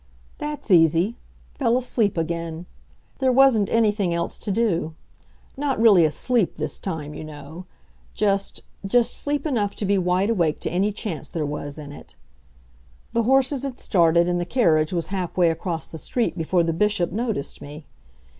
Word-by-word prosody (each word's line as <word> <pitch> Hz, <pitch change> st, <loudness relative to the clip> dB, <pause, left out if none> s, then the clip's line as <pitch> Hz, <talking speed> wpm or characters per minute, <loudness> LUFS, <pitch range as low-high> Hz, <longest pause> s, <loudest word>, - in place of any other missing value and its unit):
That's 295 Hz, -7 st, -5 dB
easy 170 Hz, +5 st, +4 dB, 0.4 s
fell 240 Hz, -3 st, +3 dB
asleep 230 Hz, -6 st, 0 dB
again. 165 Hz, 0 st, -3 dB, 0.5 s
There 260 Hz, -1 st, +3 dB
wasn't 250 Hz, -6 st, +4 dB
anything 210 Hz, -6 st, +1 dB
else 170 Hz, 0 st, -3 dB
to -, -, -5 dB
do. 190 Hz, -7 st, 0 dB, 0.6 s
Not 275 Hz, -2 st, -1 dB
really 205 Hz, -7 st, +6 dB
asleep 215 Hz, -, +1 dB
this -, -, -3 dB
time, 155 Hz, -5 st, -5 dB
you -, -, -7 dB
know; 155 Hz, +3 st, -10 dB, 0.5 s
just, 200 Hz, -1 st, 0 dB, 0.2 s
just 230 Hz, +4 st, +2 dB
asleep 290 Hz, +1 st, -2 dB
enough 220 Hz, -9 st, -1 dB
to 210 Hz, -, -3 dB
be 200 Hz, 0 st, +2 dB
wide 185 Hz, +4 st, +1 dB
awake 170 Hz, -8 st, +1 dB
to -, -, -3 dB
any 190 Hz, +4 st, +1 dB
chance 205 Hz, -6 st, -5 dB
there 160 Hz, -3 st, -3 dB
was 145 Hz, 0 st, -5 dB
in 145 Hz, -2 st, -8 dB
it. -, -, -13 dB, 1.0 s
The 235 Hz, -, +2 dB
horses 270 Hz, 0 st, +3 dB
had 270 Hz, -2 st, -4 dB
started, 170 Hz, -2 st, +3 dB
and 175 Hz, 0 st, 0 dB
the -, -, 0 dB
carriage 165 Hz, -8 st, +2 dB
was 170 Hz, -3 st, -2 dB
half 185 Hz, -2 st, -3 dB
way 175 Hz, -2 st, +4 dB
across 165 Hz, 0 st, -4 dB
the 160 Hz, -, -6 dB
street 235 Hz, -, -1 dB
before 170 Hz, +1 st, +1 dB
the 165 Hz, 0 st, 0 dB
Bishop 190 Hz, -1 st, +1 dB
noticed 220 Hz, -, -3 dB
me. 150 Hz, +1 st, -10 dB
185 Hz, 165 wpm, -23 LUFS, 165-230 Hz, 1.0 s, really